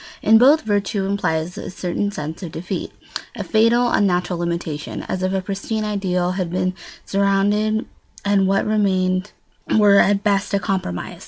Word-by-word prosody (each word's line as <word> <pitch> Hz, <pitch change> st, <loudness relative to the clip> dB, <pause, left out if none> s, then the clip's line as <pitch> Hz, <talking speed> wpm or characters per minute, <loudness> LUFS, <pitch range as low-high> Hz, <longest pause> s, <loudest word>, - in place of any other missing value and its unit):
In 220 Hz, +1 st, +6 dB
both, 280 Hz, +6 st, +5 dB
virtue 205 Hz, -2 st, -1 dB
implies 180 Hz, -4 st, -1 dB
a -, -, -6 dB
certain 185 Hz, +2 st, -2 dB
sense 155 Hz, -3 st, -6 dB
of 175 Hz, -4 st, -6 dB
defeat, 180 Hz, +3 st, -4 dB, 0.4 s
a -, -, -4 dB
fatal 230 Hz, +2 st, +3 dB
unnatural 180 Hz, -3 st, +1 dB
limitation, 170 Hz, -3 st, -4 dB
as 185 Hz, -, -4 dB
if 185 Hz, 0 st, 0 dB
a 190 Hz, 0 st, 0 dB
pristine 200 Hz, +3 st, -3 dB
ideal 185 Hz, -4 st, -1 dB
had 185 Hz, -2 st, -2 dB
been 185 Hz, +1 st, -1 dB, 0.3 s
surrendered 205 Hz, +2 st, +1 dB, 0.4 s
and 200 Hz, -1 st, +3 dB
what 195 Hz, +1 st, +1 dB
remained 190 Hz, -2 st, +1 dB, 0.5 s
were 205 Hz, -2 st, +6 dB
at 200 Hz, 0 st, +3 dB
best 200 Hz, -1 st, +1 dB
a -, -, +2 dB
compromise. 190 Hz, -, -3 dB
195 Hz, 155 wpm, -21 LUFS, 180-205 Hz, 0.5 s, In